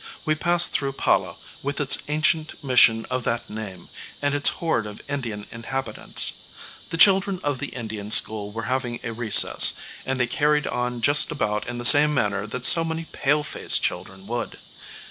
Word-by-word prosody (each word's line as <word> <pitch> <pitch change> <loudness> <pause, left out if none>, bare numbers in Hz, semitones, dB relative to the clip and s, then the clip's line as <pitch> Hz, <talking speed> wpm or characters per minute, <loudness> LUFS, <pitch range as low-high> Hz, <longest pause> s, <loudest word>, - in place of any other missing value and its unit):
We 155 - +3
passed 175 +2 +1
through 135 -1 0
Pala, - - +1 0.3
with 140 +1 -3
its 145 -2 +1
ancient 155 +1 0
mission 125 -4 +5
of 130 -1 0
that 120 -1 -1
name, 100 -5 -7 0.3
and 145 0 0
its 145 0 +3
horde 140 -10 -1
of 105 - -8
Indian 120 -8 -3
inhabitants. 115 0 -3 0.6
The 165 - -2
children 195 +1 +5
of 145 -3 0
the - - -3
Indian 110 -4 -6
school 105 -1 +1
were 115 +2 -4
having 125 -2 -1
a 120 - -3
recess, 115 -2 +1 0.3
and 135 0 -2
they 125 - +4
carried 150 +4 +2
on 125 -1 -2
just 145 +5 +3
about 105 -8 -1
in 120 0 -4
the 120 - -4
same 150 +4 +4
manner 105 -4 0
that 125 +3 -4
so 165 - +4
many 165 0 -3
"pale 150 +2 +2
faced" 150 - +1
children 95 0 -3
would. 120 +2 -3
125 Hz, 175 wpm, -24 LUFS, 110-150 Hz, 0.6 s, mission